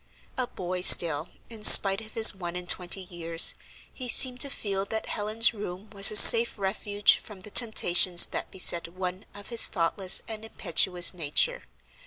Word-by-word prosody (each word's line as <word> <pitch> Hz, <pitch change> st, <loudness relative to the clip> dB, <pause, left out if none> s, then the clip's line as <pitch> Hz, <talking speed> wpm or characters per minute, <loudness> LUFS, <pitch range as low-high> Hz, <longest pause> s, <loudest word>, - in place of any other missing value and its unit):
A 255 Hz, -2 st, -6 dB
boy 180 Hz, -3 st, -9 dB
still, 165 Hz, -3 st, +3 dB, 0.2 s
in 225 Hz, -2 st, -14 dB
spite 195 Hz, 0 st, +6 dB
of 220 Hz, 0 st, -17 dB
his 220 Hz, -1 st, +5 dB
one 175 Hz, -2 st, -11 dB
and 180 Hz, 0 st, -8 dB
twenty 180 Hz, +1 st, -2 dB
years, 170 Hz, -2 st, -1 dB, 0.4 s
he 255 Hz, -2 st, -10 dB
seemed 250 Hz, +1 st, +3 dB
to 280 Hz, -, +2 dB
feel 200 Hz, -7 st, -7 dB
that 220 Hz, +2 st, -8 dB
Helen's 220 Hz, +2 st, -3 dB
room 205 Hz, -1 st, -12 dB
was 200 Hz, -2 st, +3 dB
a 215 Hz, -, -5 dB
safe 230 Hz, +2 st, +6 dB
refuge 205 Hz, +1 st, -3 dB
from 205 Hz, -3 st, -16 dB
the 210 Hz, -, -15 dB
temptations 185 Hz, -6 st, +2 dB
that -, -, -10 dB
beset 175 Hz, -2 st, -1 dB
one 185 Hz, +2 st, -10 dB
of 205 Hz, -1 st, -13 dB
his 235 Hz, -1 st, -2 dB
thoughtless 185 Hz, +1 st, -1 dB
and 220 Hz, -1 st, -10 dB
impetuous 180 Hz, -4 st, -1 dB
nature. 180 Hz, -, -4 dB
195 Hz, 170 wpm, -22 LUFS, 180-220 Hz, 0.4 s, spite